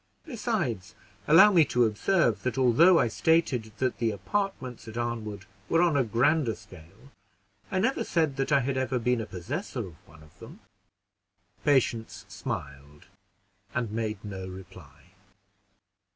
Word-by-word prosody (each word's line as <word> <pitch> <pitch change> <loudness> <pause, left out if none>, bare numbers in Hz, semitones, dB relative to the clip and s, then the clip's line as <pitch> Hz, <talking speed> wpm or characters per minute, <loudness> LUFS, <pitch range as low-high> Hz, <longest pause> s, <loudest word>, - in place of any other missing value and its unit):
Besides, 170 - -3 0.3
allow 165 +7 +8
me 170 -5 +6
to 125 -3 +2
observe, 115 - +1
that 125 0 -3
although 135 +8 +5
I 120 - +3
stated 125 -3 +1
that 130 +1 -1
the 115 - +1
apartments 130 - -3
at 110 +1 -8
Arnwood 110 -4 -4 0.2
were 165 +1 +3
on 170 -4 +2
a 140 - +3
grander 120 +2 +1
scale, 95 - -16 0.6
I - - -2
never 240 +8 +1
said 160 -5 0
that 135 +2 -1
I 140 -2 +4
had 130 +1 -2
ever 130 0 0
been 125 0 0
a 110 - -6
possessor 120 - -5
of 85 -2 -15
one 80 -1 -17
of 75 - -21
them." - - -12 1.0
Patience 125 -6 0
smiled 70 +2 -7 0.7
and 120 -4 -1
made 110 -2 -3
no 95 -2 -6
reply. 90 -4 -13
120 Hz, 145 wpm, -27 LUFS, 105-150 Hz, 1.0 s, allow